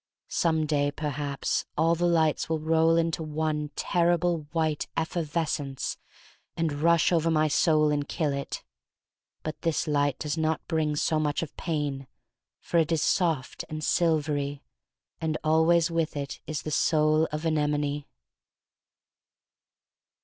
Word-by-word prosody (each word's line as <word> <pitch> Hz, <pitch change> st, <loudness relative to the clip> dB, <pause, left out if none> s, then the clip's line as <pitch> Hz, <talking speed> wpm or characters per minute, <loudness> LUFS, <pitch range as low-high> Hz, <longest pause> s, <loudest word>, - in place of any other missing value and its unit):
Some 160 Hz, -2 st, +1 dB
day, 145 Hz, -1 st, +1 dB
perhaps, 145 Hz, -1 st, -2 dB
all 165 Hz, +2 st, +3 dB
the 175 Hz, +1 st, +1 dB
lights 160 Hz, -3 st, +2 dB
will 160 Hz, -, +1 dB
roll 160 Hz, +1 st, +3 dB
into 165 Hz, 0 st, 0 dB
one 155 Hz, -1 st, -2 dB
terrible 175 Hz, -2 st, +1 dB
white 160 Hz, -3 st, 0 dB
effervescence 155 Hz, -4 st, -2 dB, 0.6 s
and 165 Hz, -2 st, 0 dB
rush 170 Hz, 0 st, +4 dB
over 165 Hz, -1 st, +2 dB
my 155 Hz, -1 st, +3 dB
soul 155 Hz, 0 st, +3 dB
and 145 Hz, -1 st, -1 dB
kill 155 Hz, -4 st, 0 dB
it. 140 Hz, 0 st, -5 dB, 0.8 s
But 155 Hz, -, -5 dB
this 165 Hz, -2 st, 0 dB
light 145 Hz, -2 st, +1 dB
does 150 Hz, +1 st, -3 dB
not 160 Hz, 0 st, -1 dB
bring 155 Hz, -2 st, 0 dB
so 155 Hz, +1 st, +1 dB
much 150 Hz, +1 st, 0 dB
of 155 Hz, -, -8 dB
pain, 145 Hz, -5 st, -3 dB, 0.5 s
for 170 Hz, -, 0 dB
it 165 Hz, 0 st, +1 dB
is 160 Hz, -2 st, +2 dB
soft 160 Hz, -9 st, 0 dB
and 155 Hz, 0 st, -5 dB
silvery, 150 Hz, -4 st, 0 dB, 0.6 s
and 155 Hz, -1 st, -1 dB
always 160 Hz, +2 st, +3 dB
with 165 Hz, -2 st, -1 dB
it 140 Hz, -1 st, -5 dB
is 155 Hz, -1 st, -3 dB
the 155 Hz, -, -4 dB
Soul 155 Hz, +1 st, +3 dB
of 150 Hz, +2 st, -4 dB
Anemone. 150 Hz, -2 st, 0 dB
155 Hz, 135 wpm, -27 LUFS, 150-165 Hz, 0.8 s, rush